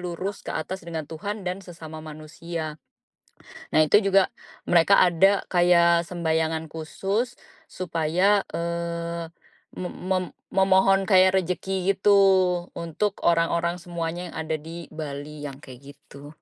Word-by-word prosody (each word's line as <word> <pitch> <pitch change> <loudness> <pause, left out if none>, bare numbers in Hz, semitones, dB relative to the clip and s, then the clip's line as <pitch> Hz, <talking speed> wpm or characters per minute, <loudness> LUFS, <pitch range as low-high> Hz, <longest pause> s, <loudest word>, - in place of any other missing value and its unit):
lurus 180 +3 -4
ke - - -12
atas 185 +5 -4
dengan 165 -2 -5
Tuhan 195 +7 -6
dan 180 +1 -3
sesama 165 -4 -10
manusia. 155 0 -7 0.9
Nah, 155 - +4
itu 205 +8 +5
juga 195 -1 +3 0.3
mereka 175 +3 +5
ada 190 +3 +3
kayak 170 -1 +5
sembahyangan 160 -2 -1
khusus 195 +9 -3 0.3
supaya, 180 +3 +1
eee, 170 0 -3 0.5
me 180 - -4
mem 185 0 -2 0.3
memohon 195 0 +4
kayak 185 -1 +6
rezeki 190 +1 -1
gitu 200 +1 +3 0.6
untuk 180 +5 -2
orang-orang 170 +1 +2
semuanya 170 +1 -4
yang - - -12
ada 160 0 -2
di 165 +2 -8
Bali 150 -1 -6
yang 135 -2 -7
kayak 135 +1 -12
gitu. 140 0 -14
170 Hz, 125 wpm, -25 LUFS, 160-190 Hz, 0.9 s, kayak